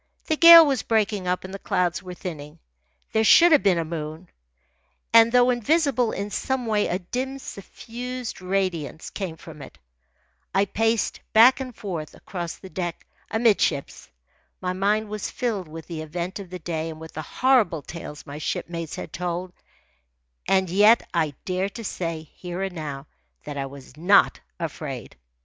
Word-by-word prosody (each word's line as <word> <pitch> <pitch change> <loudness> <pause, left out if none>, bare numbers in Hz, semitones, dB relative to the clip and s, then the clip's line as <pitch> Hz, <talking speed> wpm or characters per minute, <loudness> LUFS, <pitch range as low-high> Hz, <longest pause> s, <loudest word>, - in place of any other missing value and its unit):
The 315 - +1
gale 335 0 +10
was 275 -5 +1
breaking 210 -4 0
up, 180 0 0
and 190 0 -8
the 195 - -6
clouds 180 -1 0
were 180 -1 -8
thinning. 155 -4 -7 0.5
There 220 - +2
should 340 +10 +7
have 300 - +6
been 190 -4 +3
a 165 - -1
moon, 160 +1 -6 0.8
and, 230 0 +7
though 250 0 +5
invisible, 250 -1 +1
in 200 +1 -4
some 265 +2 -2
way 210 -2 +1
a 180 - 0
dim, 255 +9 -4
suffused 245 +1 -7
radiance 185 -5 -2
came 180 -5 -5
from 155 -3 -12
it. 135 - -12 0.8
I 195 +1 +4
paced 225 +3 0
back 240 +5 +7
and 255 -3 -6
forth 170 -8 -6
across 175 -3 -6
the 190 - -11
deck 175 -1 -5 0.2
amidships. 215 - +1 0.5
My 180 0 -2
mind 205 +3 +1
was 210 -1 -4
filled 215 -8 -2
with 160 0 -9
the 165 -3 -6
event 175 +5 -5
of 195 -3 -9
the 180 - -6
day 165 -1 -4
and 155 -1 -8
with 160 0 -10
the 155 - -5
horrible 210 - +2
tales 155 -3 -9
my 145 0 -8
shipmates 165 +1 -4
had - - -8
told, 180 +1 -4 0.9
and 190 -1 +3
yet 210 +6 +5
I 155 -5 0
dare 185 +1 -1
to 230 +3 -9
say, 165 -5 -4
here 180 +1 -5
and 195 -1 -3
now, 145 -4 -6 0.4
that 145 - -7
I 135 -1 -3
was 135 0 -13
not 180 +6 +4 0.2
afraid. 145 - -6
185 Hz, 165 wpm, -24 LUFS, 165-225 Hz, 0.9 s, gale